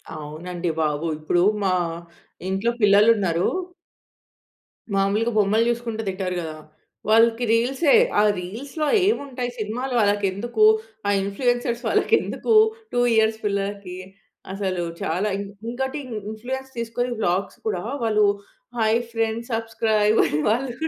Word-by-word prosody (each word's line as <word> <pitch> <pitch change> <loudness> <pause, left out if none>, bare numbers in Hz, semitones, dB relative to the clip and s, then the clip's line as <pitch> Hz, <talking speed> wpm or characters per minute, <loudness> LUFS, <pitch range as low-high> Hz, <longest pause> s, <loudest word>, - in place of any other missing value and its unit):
అవునండి 170 +4 -5
బాబు. 155 +1 -1
ఇప్పుడు 175 +3 +1 0.2
మా 190 -2 +2 0.8
ఇంట్లో 195 +5 0
పిల్లలున్నారు. 200 -4 +4 1.5
మాములుగా 205 +4 +1
బొమ్మలు 215 +3 +3
చూసుకుంట 230 -2 -2
తింటారు 185 -1 -3
కదా! 160 -2 -6 0.5
వాళ్ళకి 230 +2 +4
రీల్సే 265 +6 +2 0.3
ఆ - - +6 0.2
రీల్స్‌లో 265 - -4 0.2
ఏముంటాయి 265 - -2
సినిమాలు 240 +5 -3
వాళ్ళకి 205 -1 +2
ఎందుకు? 220 +3 -1 0.4
ఆ - - +2
ఇన్‌ఫ్లూయెన్సర్స్ 240 +3 -1
వాళ్ళకి - - +1
ఎందుకు 460 - -2 0.4
2 245 - +2
ఇయర్స్ 220 0 +3
పిల్లలకి? 200 -2 -3 0.6
అసలు 190 -3 -2 0.2
చాలా 180 +6 -1
ఇం 200 - -3 0.3
ఇంకోటి 265 +4 -3 0.3
ఇన్‌ఫ్లూయెన్స్ 265 +4 -6
తీసుకొని 235 +2 -2
వ్లాగ్స్ 190 0 -1
కూడా 180 -4 -2 0.2
వాళ్ళు 215 -2 +3 0.5
హాయ్ 225 0 +3
ఫ్రెండ్స్ 225 +1 -2
సబ్‌స్క్రయిబ్ 220 -1 +1
అని 150 - -1
వాళ్ళు 245 +2 0
220 Hz, 115 wpm, -23 LUFS, 195-235 Hz, 1.5 s, ఆ